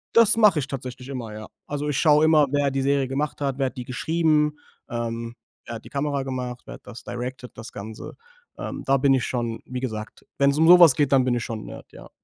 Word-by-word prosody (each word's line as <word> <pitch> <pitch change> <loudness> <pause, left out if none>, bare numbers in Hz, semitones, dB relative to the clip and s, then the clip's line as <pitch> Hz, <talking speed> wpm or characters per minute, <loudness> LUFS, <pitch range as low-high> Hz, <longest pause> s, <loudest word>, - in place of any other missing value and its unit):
Das 230 -2 +6
mache 210 -8 +5
ich 135 - -3
tatsächlich 130 -1 -7
immer, 120 -5 -6
ja. 110 0 -8 0.2
Also, 145 0 -3
ich 145 -2 -1
schaue 150 -1 +5
immer, 155 -2 +5
wer 145 -1 +2
die 135 0 -2
Serie 140 0 +1
gemacht 145 +4 -3
hat, 140 -2 -2
wer 135 -1 +1
hat 130 - -9
die 125 - -5
geschrieben, 150 +2 +1 0.3
ähm, 115 0 -4 0.3
wer 120 - -6
hat 115 - -10
die - - -11
Kamera 140 -1 -2
gemacht, 125 -2 -5
wer - - -9
hat - - -16
das 120 - -10
directed, 125 +1 -6
das 110 - -9
Ganze. 110 +2 -9 0.4
Ähm, - - -6
da 135 0 +3
bin 135 0 +3
ich 130 -2 +1
schon 120 -2 -3
wie 125 0 -5
gesagt, 110 -4 -6
wenn's 140 +1 +3
um 160 +1 +4
sowas 170 -6 +8
geht, 145 -2 +1
dann 130 - +5
bin 125 -1 +1
ich 120 - -2
schon 115 -2 -5
'n - - -11
Nerd, - - -11
ja. - - -13
135 Hz, 240 wpm, -24 LUFS, 120-145 Hz, 0.4 s, sowas